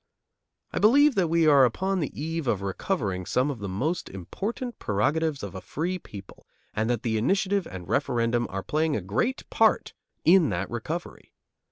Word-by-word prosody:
I - - -1
believe 280 +7 +6
that 190 -6 +2
we 165 0 +3
are 145 -3 +7
upon 190 - +1
the 150 - -1
eve 165 -1 -3
of 100 -4 0
recovering 100 - -2
some 130 +3 +1
of 130 - -7
the 100 -1 -5
most 140 - -2
important 215 - -5
prerogatives 145 +8 0
of 100 -3 -6
a 95 - -7
free 180 +5 -3
people, 100 - -12 0.3
and 110 +2 -1
that 120 -2 -1
the 110 -2 0
initiative 195 - +1
and 90 -2 -8
referendum 120 -1 +1
are 95 0 -4
playing 155 0 0
a - - -1
great 115 - -1
part - - +2 0.3
in 170 -4 +6
that 90 -1 -3
recovery. 155 +9 -6
140 Hz, 175 wpm, -26 LUFS, 105-175 Hz, 0.3 s, are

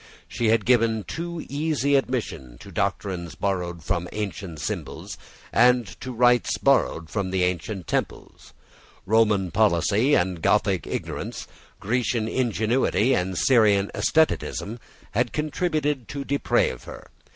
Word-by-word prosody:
She 115 0 -1
had 110 -1 +3
given 115 -3 +3
a - - -12
too 170 - -5
easy 145 -1 0
admission 110 - -2
to - - -11
doctrines 90 -4 -2
borrowed 90 -4 -2
from 85 +1 -1
the - - -11
ancient 95 -6 -5
schools, - - -5 0.4
and 125 0 +5 0.2
to 130 - -5
rites 120 0 +3
borrowed 80 0 +2
from 100 0 -2
the 95 -1 0
ancient 90 +1 -2
temples. - - -4 0.5
Roman 105 -3 +2
policy 105 - +3
and 90 -1 0
Gothic - - +1
ignorance, - - -5 0.3
Grecian 115 0 0
ingenuity 115 0 +1
and 95 -5 -1
Syrian 105 -5 +4
asceticism, 125 -7 0 0.3
had 120 +2 0
contributed 150 -4 -1
to 140 -1 -5
deprave 140 - 0
her. - - -11
110 Hz, 130 wpm, -24 LUFS, 95-125 Hz, 0.5 s, and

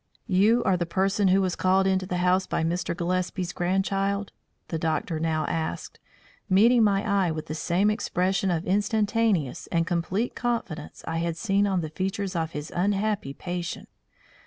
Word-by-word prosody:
"You 210 +6 +3
are 185 - +2
the 175 -1 -2
person 195 +3 +1
who 190 +1 +4
was 185 -2 -1
called 190 +1 +2
into 190 -1 +1
the 180 - -2
house 185 +1 +2
by - - -1
Mr. 170 +1 -1
Gillespie's 180 0 -2
grandchild?" 195 +2 0 0.4
the 165 - -2
doctor 160 0 -1
now 155 -1 0
asked, 160 +1 -4 0.5
meeting 225 +5 +5
my 200 -1 +2
eye 200 -3 +2
with 155 -1 -4
the 155 - -5
same 180 +6 +1
expression 190 -2 0
of 170 -1 -1
instantaneous 205 - +1
and 165 -1 0
complete 185 +6 -1
confidence 235 -9 -3
I 165 - -2
had 165 0 -2
seen 200 +1 +1
on 190 -3 +1
the 155 - -4
features 190 +3 -3
of 165 -1 -2
his 150 +1 -6
unhappy 200 -5 0
patient. 175 0 -5
185 Hz, 165 wpm, -26 LUFS, 170-200 Hz, 0.5 s, meeting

